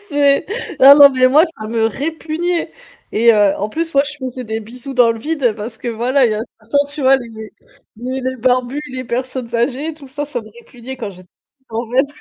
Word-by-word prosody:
C'est 285 -2 +2 0.3
ah 275 +2 +10
non 285 -1 +9
mais 255 -1 +3
moi, 300 +6 +5 0.2
ça 215 - -5
me 225 0 +1
répugnait 325 +7 -3 0.4
et 230 +2 +5
heu, 205 -2 +3
en 205 - -3
plus 325 +8 -3
moi 275 - +5
je 290 0 -7
faisais 255 -2 -6
des 220 0 -4
bisous 250 +5 -9
dans 245 -2 +5
le 230 - -8
vide, 270 -3 -1
parce 225 +2 -7
que 240 - -5
voilà, 245 +3 +2
il 220 - 0
y - - -2
en - - -3
a - - -2 0.2
certains, 285 +7 +1
tu 300 - -5
vois 270 +1 +5
les 225 -3 -9 0.4
les 255 +3 -4
les 260 0 -3
barbus, 255 +3 0
les 255 0 -5
personnes 250 0 -4
âgées, 265 +7 -1
tout 290 -3 -13
ça, 290 +3 -5
ça 280 -4 -5
me 215 - -14
répugnait 245 +2 -10
quand 225 -5 -5
j'étais 180 -1 -16 0.4
en 230 +2 -3
fait. 265 +3 +2
255 Hz, 225 wpm, -17 LUFS, 230-280 Hz, 0.4 s, ah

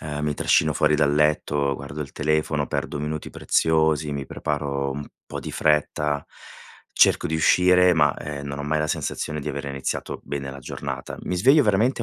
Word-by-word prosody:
uhm, 75 -1 -5
mi 75 -1 -1
trascino 75 +1 +2
fuori 75 +1 +2
dal 75 -1 +2
letto, 75 -2 +1
guardo 70 +2 -7
il 70 - -11
telefono, 75 -1 0
perdo - - -3
minuti 75 +1 -4
preziosi, 80 -2 +1
mi 70 -1 -4
preparo 70 -2 -2
un 75 +1 -7 0.2
po' - - -6
di - - -6
fretta, 75 -1 +1 0.7
cerco - - +4
di 80 - -2
uscire 90 +3 +5
ma, 75 -3 +3
uhm, 75 -1 -6
non 70 0 -5
ho 70 - -4
mai 75 +2 0
la 75 - 0
sensazione 75 0 -3
di - - -5
avere 70 0 -4
iniziato 70 -1 -4
bene 70 -1 -5
la 70 - -9
giornata. - - -6
Mi 90 - -3
sveglio 135 - +5
veramente 115 +4 +2
75 Hz, 185 wpm, -24 LUFS, 70-80 Hz, 0.7 s, uscire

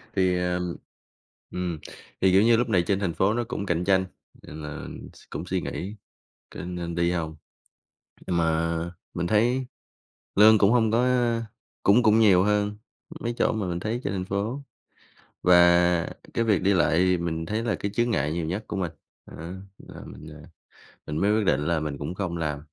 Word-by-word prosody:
thì, 95 -1 +2
ờm, 90 -1 -2 0.8
ừm, 90 -3 -3 0.4
thì, 95 -1 +4
kiểu 95 +2 +5
như, 115 0 +5
lúc 120 -1 0
này 90 -5 +3
trên 100 -1 +1
thành 90 -5 -1
phố 95 +5 +2
nó 120 +1 0
cũng 100 -4 -4
cạnh 90 -1 0
tranh, 95 -1 +3 0.4
nên 80 +1 -9
là 75 0 -7 0.3
s - - -18
cũng - - -5
suy - - -1
nghĩ 100 +4 -5 0.6
có - - -8
nên 85 -1 -5
đi 85 +1 +1
hông. 80 -3 -3 0.9
Mà 85 -1 +1 0.4
mình 85 -1 -2
thấy 120 +6 +2 0.7
lương 110 +2 +7
cũng 100 +1 +4
hông 115 -3 +3
có 120 +2 +3 0.8
cũng 110 +5 +5
cũng 110 0 +4
nhiều 95 -4 +6
hơn 105 0 +1 0.4
mấy 120 0 -3
chỗ - - +2
mà 105 -4 -2
mình 85 0 -3
thấy 115 +4 -2
trên - - -1
thành 95 -1 -3
phố, 105 +9 -3 0.8
và 85 -1 +5 0.3
cái 115 - +1
việc 105 -5 +2
đi 100 +1 +3
lại 85 -2 +3
thì 90 -1 +3
mình 80 -1 -3
thấy 110 +2 -2
là 110 - 0
cái 100 - -3
chướng 120 0 +1
ngại 75 -6 0
nhiều 85 -1 -2
nhất 95 +6 -3
của 105 - -4
mình, 90 -4 -2 0.3
đó, - - -12 0.4
là - - -12
mình, 75 - -11
ờ, 75 -1 -12 0.7
mình 75 - -3
mới 105 +2 +3
quyết 105 - 0
định 75 -4 +1
là 85 -2 +1
mình 75 -2 -4
cũng 75 +5 -5
không 90 -4 -3
làm. 75 -3 -2
90 Hz, 195 wpm, -25 LUFS, 85-105 Hz, 0.9 s, lương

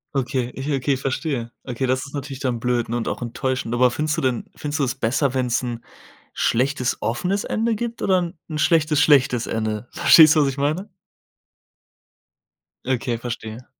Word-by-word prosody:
Okay, 125 -2 -1
ich 135 +3 -4
okay, 135 0 +1
verstehe. 130 -2 -3
Okay, 130 0 -3
das 130 +2 0
ist 140 - -13
natürlich 140 -2 -5
dann 125 -4 -1
blöd, 120 -1 0
ne? 120 +1 -2
Und 115 - -3
auch - - -3
enttäuschend, 125 0 -2
aber 125 +1 +4
findest 150 +5 -1
du - - 0
denn 130 -3 -1
findest 150 +1 -4
du 140 - +2
es 125 - 0
besser, 135 +2 0
wenn's 125 -2 0
'n 120 -1 -5 0.5
schlechtes 130 +1 0
offenes 180 - -1
Ende 225 +1 0
gibt 235 +2 -4
oder 180 -3 +2 0.2
'n 155 -2 -4
schlechtes 155 -2 +3
schlechtes 135 -5 +4
Ende? 110 +1 -2
Verstehst 160 -2 +7
du, 155 - +5
was 140 - +2
ich 135 - -6
meine? 155 +8 -1 2.0
Okay, 125 -2 -1
verstehe. 115 0 -6
130 Hz, 175 wpm, -22 LUFS, 120-150 Hz, 2.0 s, Verstehst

